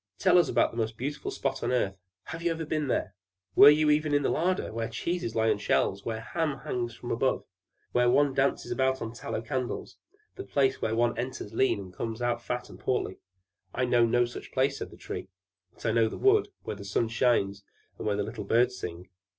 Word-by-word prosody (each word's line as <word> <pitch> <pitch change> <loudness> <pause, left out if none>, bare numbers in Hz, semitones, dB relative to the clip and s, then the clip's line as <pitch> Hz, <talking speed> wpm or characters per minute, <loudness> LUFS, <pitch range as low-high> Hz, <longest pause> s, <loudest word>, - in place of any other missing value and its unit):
"Tell 180 -2 +5
us 175 - +3
about - - +3
the 115 - -10
most 110 -1 -2
beautiful 140 +5 -4
spot 135 -1 -2
on - - -1
the 125 - +2
earth. 100 -5 0 0.3
Have - - -7
you 170 - +1
never 165 -1 -2
been 150 -1 -1
there? 100 -6 -1 0.4
Were 140 - +10
you 150 +1 +4
never 150 -1 +1
in 145 - +2
the - - +2
larder, 180 -3 0
where 115 0 -2
cheeses 120 0 -3
lie 110 0 +3
on 105 - +1
the - - -11
shelves, 100 +1 +1
and 110 -1 -2
hams 155 +4 -2
hang 120 -1 -2
from 120 +1 -7
above; 130 +3 0 0.5
where 125 0 +3
one 145 +2 +4
dances 135 +1 0
about 130 0 +1
on 115 0 -5
tallow 115 -2 -4
candles: 130 0 -4 0.4
that 390 - -8
place 135 -1 +2
where 110 - 0
one 120 +1 +2
enters 120 -4 -5
lean, 130 -2 +2
and 95 -2 -9
comes 115 +4 -4
out 120 -1 0
again 120 - -22
fat 125 0 -2
and - - -12
portly?" 110 -7 -1 0.6
"I 125 - +1
know 120 -1 +4
no 120 +1 +3
such 120 - -9
place," 135 +1 +1
said - - -5
the - - -14
Tree. - - -6 0.5
"But - - -13
I 115 - +3
know 115 0 +3
the - - -7
wood, 400 +1 +4 0.2
where - - -4
the 100 - -9
sun 100 +4 0
shines 110 -4 +1 0.4
and - - -3
where 105 - +1
the 105 - 0
little 110 0 -6
birds 125 +5 +2
sing." 90 +1 -6
120 Hz, 230 wpm, -28 LUFS, 110-140 Hz, 0.6 s, Were